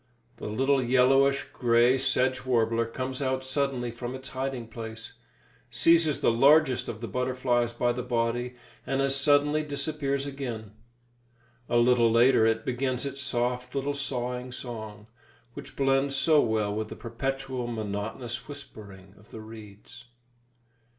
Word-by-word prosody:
The - - -6
little 135 +5 +1
yellowish 135 +2 +3
grey 120 +1 +4
sedge 130 -1 +1
warbler 115 -2 +1
comes 130 +3 -5
out 130 -1 -1
suddenly 130 -3 -1
from 120 +2 -6
its 130 0 -8
hiding 130 -3 -4
place, 115 0 -8 0.6
seizes 165 -3 +3
the - - +4
largest 135 +2 +4
of 110 - -6
the 115 - -4
butterflies 125 +1 0
by 120 0 0
the 125 +1 -3
body, 120 +1 -1 0.3
and 135 - 0
as 135 0 +2
suddenly 145 +2 +3
disappears 140 -1 -2
again. 125 -7 -6 1.0
A 120 - +2
little 120 -1 +4
later 115 0 +5
it 115 0 0
begins 130 +1 -1
its 140 0 -4
soft 125 -1 -1
little 140 +1 -1
sawing 125 -2 -3
song, 110 -4 -7 0.5
which 145 +1 -10
blends 135 0 +2
so 155 +1 +5
well 110 -3 0
with 110 +1 -3
the - - -8
perpetual, 130 +1 -4
monotonous 110 +1 -5
whispering 100 -9 -11
of 105 - -21
the 110 - -9
reeds. 110 +2 -12
125 Hz, 140 wpm, -27 LUFS, 115-135 Hz, 1.0 s, later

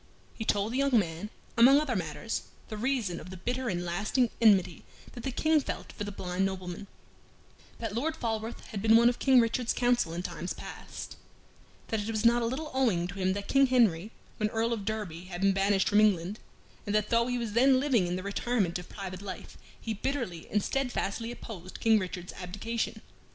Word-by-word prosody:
He 220 - -5
told 205 +2 +1
the 260 - 0
young 275 -3 +4
man, 170 0 -1 0.3
among 260 +5 +7
other 285 -6 -1
matters, 180 +5 -3 0.3
the 215 - -5
reason 225 -6 -1
of - - -10
the 185 - -8
bitter 245 +6 -2
and 175 -1 -2
lasting 210 +8 +1
enmity 195 -6 +4 0.3
that 240 - -8
the 265 - -2
King 310 +4 +3
felt - - -5
for 205 - -5
the 205 - -5
blind 185 -1 -2
nobleman: 190 0 -4 0.9
that 225 -3 -4
Lord 300 +8 -1
Falworth 225 -2 -3
had 200 - -4
been 220 +1 +5
one 235 +1 +7
of 245 - -3
King 265 -2 +6
Richard's 230 +1 +1
council 245 -8 +2
in 175 +1 -3
times 180 0 -4
past; - - -8 0.7
that 220 - 0
it 205 +2 -3
was 220 0 -1
not 235 +1 +5
a 230 - +1
little 300 +6 -4
owing 230 -10 +2
to 195 +1 -7
him 185 0 +2
that 200 0 -5
King 275 0 +5
Henry, 220 -7 +3 0.3
when 215 0 0
Earl 225 +1 0
of 210 -4 -4
Derby, 200 -6 -4
had 180 -1 -7
been 195 0 +4
banished 195 0 +2
from 205 +1 +5
England, 200 -1 +2 0.5
and 205 - 0
that 210 0 +1
though 235 0 +3
he 245 0 0
was 230 -3 -3
then 260 +3 +5
living 255 -10 +2
in 175 - -1
the 185 - -4
retirement 200 -3 0
of 180 - -11
private 190 -2 -7
life, 190 -3 -8 0.2
he 225 - -3
bitterly 215 - -3
and 210 -1 +1
steadfastly 240 -4 -2
opposed 190 -7 -9
King 225 -1 +4
Richard's 180 -2 -5
abdication. 205 +6 -4
215 Hz, 205 wpm, -29 LUFS, 185-240 Hz, 0.9 s, among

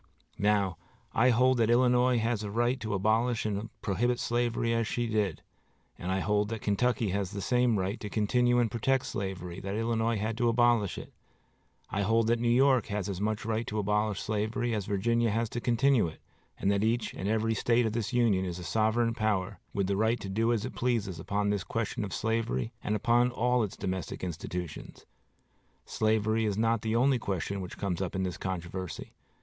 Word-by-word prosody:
Now, 100 -4 +2 0.4
I 125 +3 +4
hold 125 +2 +4
that 115 -1 +3
Illinois 125 +1 +4
had 115 -1 0
a 105 - -4
right 120 +4 +1
to 110 -3 -2
abolish 110 +4 +1
and 105 +1 -2
prohibit 120 +5 0
slavery 120 -1 0
as 115 -1 0
she 120 0 -1
did, 105 -7 -1 0.5
and 90 - -4
I 95 0 0
hold 105 +1 +1
that 115 -2 -5
Kentucky 115 +1 +1
has 100 -1 -1
the 100 0 -6
same 125 +3 +2
right 95 +3 -2
to 105 - -6
continue 120 +4 +2
and 120 -3 +2
protect 130 +4 +1
slavery 95 -3 -4
that 100 +1 -4
Illinois 115 0 0
had 110 +3 -3
to 120 -1 +3
abolish 120 -4 +2
it. - - -9 0.8
I 100 - -1
hold 115 +3 +2
that 120 0 +2
New 120 0 +1
York 130 0 +4
had 100 -1 -2
as 95 -1 -4
much 110 0 -1
right 115 0 -1
to 105 - -3
abolish 105 0 0
slavery 110 +3 -1
as 105 -3 -2
Virginia 115 +4 +1
has 115 +1 0
to 120 - -4
continue 120 -3 +3
it, 80 - -9 0.4
and 100 - +1
that 100 0 +1
each 115 +2 0
and 95 - -3
every 110 +1 +1
State 115 +2 +2
of 110 - -1
this 115 -3 -2
Union 115 -6 +2
is 90 -2 -4
a 90 - -7
sovereign 110 +4 +1
power, 110 -4 -1
with 100 - 0
the 100 +1 0
right 110 +2 +2
to 100 - -5
do 115 +4 +1
as 110 -3 0
it - - -5
pleases 110 -8 -1
upon 100 +4 -1
this 100 -2 -1
question 115 -1 -3
of 100 - -5
slavery 115 +2 -1
and 105 - 0
upon 120 +3 +3
all 125 0 +1
its 105 -4 -3
domestic 95 -2 -4
institutions. 90 -1 -6 0.8
Slavery 110 0 +1
is 105 -2 -1
not 115 0 +2
the 110 0 -1
only 130 +2 +3
question 100 -1 -3
which 90 - -7
comes 95 -3 -2
up 95 -1 -3
in 95 - 0
this 90 -2 -3
controversy. 95 -1 -5
110 Hz, 200 wpm, -29 LUFS, 100-120 Hz, 0.8 s, I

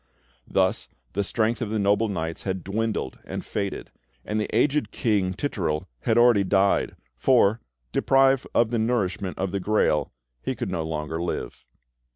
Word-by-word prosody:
Thus - - +1 0.3
the 100 - 0
strength 115 +4 0
of 115 - -2
the 110 - -1
noble 100 +2 +2
knights 85 -5 -3
had 95 -2 -3
dwindled 105 -6 -2
and - - -6
faded; 100 -2 -4 0.3
and 105 +1 -1
the - - -3
aged 135 0 +2
King 100 -5 0
Titurel 85 - -2
had 110 - +1
already 120 -4 +6
died, 100 +1 +2 0.2
for, 115 - +3 0.3
deprived 135 -1 +3
of 115 -1 +3
the 120 - +1
nourishment 100 -5 -1
of 95 -1 -2
the 100 - -1
Grail, 90 -7 +1 0.3
he - - -2
could - - -4
no 85 -3 -1
longer 80 0 -3
live. 85 -7 -4
100 Hz, 160 wpm, -25 LUFS, 90-115 Hz, 0.3 s, already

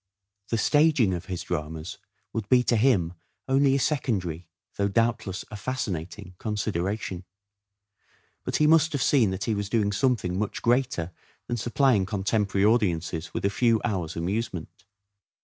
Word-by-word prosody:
The 115 - 0
staging 145 -4 +3
of 90 -1 -4
his 90 -2 -4
dramas 80 +1 -5 0.3
would 110 -3 -3
be 125 -1 +5
to 120 - +2
him 105 -8 +3 0.3
only 135 0 +3
a - - +2
secondary, 95 - -1 0.3
though 100 - +1
doubtless 110 -2 0
a - - -6
fascinating 95 -7 -4
consideration; 100 -3 -2 1.2
but - - -3
he 150 - +3
must 160 0 +4
have 140 - 0
seen 125 -8 +4
that 95 +1 -3
he 110 - 0
was 100 -1 -3
doing 105 -2 +1
something 100 -5 0
much 105 - -3
greater 120 -8 +1 0.3
than 120 - -2
supplying 120 -3 +2
con 100 -3 -3
temporary 100 -1 +1
audiences 90 -7 +1
with - - -2
a 100 - +2
few 115 0 +3
hours' 90 -8 -2
amusement. 95 +1 -4
105 Hz, 150 wpm, -26 LUFS, 90-120 Hz, 1.2 s, be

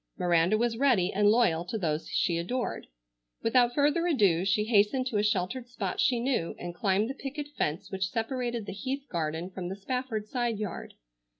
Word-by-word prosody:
Miranda 175 +2 +3
was 230 0 0
ready 230 -10 +3
and 205 +1 +4
loyal 210 -8 +3
to 190 +5 -4
those 160 -5 -2
she 170 -2 +1
adored. 245 +9 -3 0.6
Without 245 +1 +3
further 295 +4 +2
ado 200 - +3
she 195 +2 +2
hastened 220 +4 +3
to 245 -5 -1
a 205 - +2
sheltered 210 +4 -1
spot 245 - -4
she 250 -3 +3
knew 240 -9 -1
and 175 0 -6
climbed 195 +4 +1
the 265 - -3
picket 285 +2 -6
fence 165 - -3
which 190 -1 -1
separated 235 0 -2
the - - -6
Heath 265 +7 -4
garden 165 +1 -2
from 180 -1 -5
the 190 - -4
Spafford 225 +1 -3
side 240 -2 -1
yard. 210 -1 -5
215 Hz, 185 wpm, -29 LUFS, 185-250 Hz, 0.6 s, and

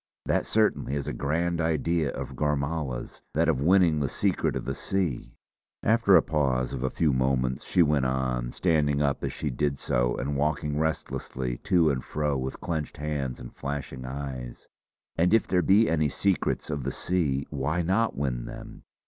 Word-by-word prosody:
That - - +1
certainly 105 -10 +1
is 70 - -3
a - - -2
grand 85 +4 0
idea 80 -1 +1
of - - -6
Gormala's, 75 -3 -2
that 80 +2 +3
of 75 -5 +1
winning 85 -1 +4
the 70 - 0
Secret - - 0
of - - -3
the 65 - -2
Sea!" 90 -3 -2 0.5
After 110 -3 +5
a - - +7
pause 70 -6 0
of 65 - -4
a 65 - 0
few 75 0 +1
moments 65 -1 0
she 90 - +4
went 75 -3 +2
on, 65 -2 -1
standing 75 -4 +2
up 70 -1 0
as - - -1
she 75 - -3
did 70 +2 -1
so - - 0
and 70 +2 -2
walking 75 +1 0
restlessly 65 -5 -2
to 85 -6 +3
and 65 -2 -2
fro 75 -1 -1
with 65 0 -3
clenched 80 -4 -3
hands 75 -4 -3
and - - -10
flashing 70 -2 -5
eyes: 65 -2 -6 0.5
"And 90 +6 +4
if 115 - +3
there 90 -1 +2
be 100 +5 +5
any 80 -2 +2
Secrets 95 -1 0
of 70 -2 -3
the 70 - -2
Sea 75 -6 0
why 75 +5 -1
not 100 +4 +1
win 65 -4 -2
them? - - -9
75 Hz, 180 wpm, -27 LUFS, 65-80 Hz, 0.5 s, a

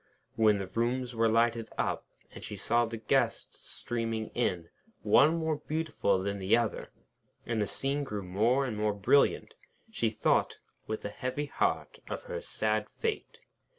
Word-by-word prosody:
When 110 -2 +4
the 100 - -3
rooms 120 +5 -1
were 115 0 +2
lighted 115 0 +2
up, - - -1 0.2
and - - -11
she - - -6
saw 120 +1 +2
the 115 0 -5
guests 110 -1 0
streaming 115 -2 -3
in, 90 -8 -1 0.3
one 155 +4 +5
more 160 -2 0
beautiful 155 -10 0
than 100 +1 -2
the 95 +4 +3
other, 115 -3 -2 0.6
and 115 -2 -1
the 105 - 0
scene 140 +7 -1
grew 105 -7 -4
more 110 +9 +2
and 120 -4 -3
more 105 0 0
brilliant, 100 +8 +3 0.4
she - - +1
thought, - - +1 0.3
with 110 - -4
a - - -2
heavy 130 +7 -3
heart, - - -1
of - - -4
her - - -5
sad 110 0 -1
fate. 450 -2 -4
115 Hz, 160 wpm, -30 LUFS, 105-130 Hz, 0.6 s, one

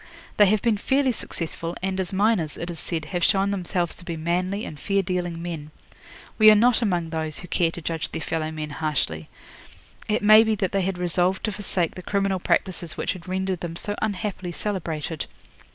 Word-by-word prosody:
They 205 - +7
have 210 +1 +2
been 230 -3 +3
fairly 265 +4 +2
successful, 165 -5 -4
and 190 0 -1
as 190 +1 -1
miners, 195 -5 +1
it 170 +1 -4
is 165 - -6
said, 160 -3 -3
have 175 -1 0
shown 195 +2 +3
themselves 180 -3 -1
to - - -13
be 170 -1 -4
manly 180 +5 -1
and 150 - -8
fair 195 -1 +1
dealing 175 -2 -2
men. 165 -3 -5 0.7
We 215 0 +9
are 215 - +8
not 240 +3 +4
among 175 -7 0
those 155 -2 -2
who 180 - -9
care 170 0 +2
to 170 0 -8
judge 165 -1 -3
their - - -3
fellow 155 0 -1
men 155 -1 -5
harshly. 140 - -2 0.8
It 210 0 0
may 215 +1 +9
be 220 -1 +1
that 190 -2 -1
they 195 - +1
had 190 0 -1
resolved 180 +2 +1
to 215 - 0
forsake 190 -4 -1
the 185 - -8
criminal 195 0 0
practices 175 -2 -1
which - - -1
had 180 -2 -11
rendered 190 -1 -1
them 170 -1 -5
so 205 +4 -1
unhappily 200 -4 -2
celebrated. 165 -6 -3
180 Hz, 200 wpm, -25 LUFS, 165-200 Hz, 0.8 s, We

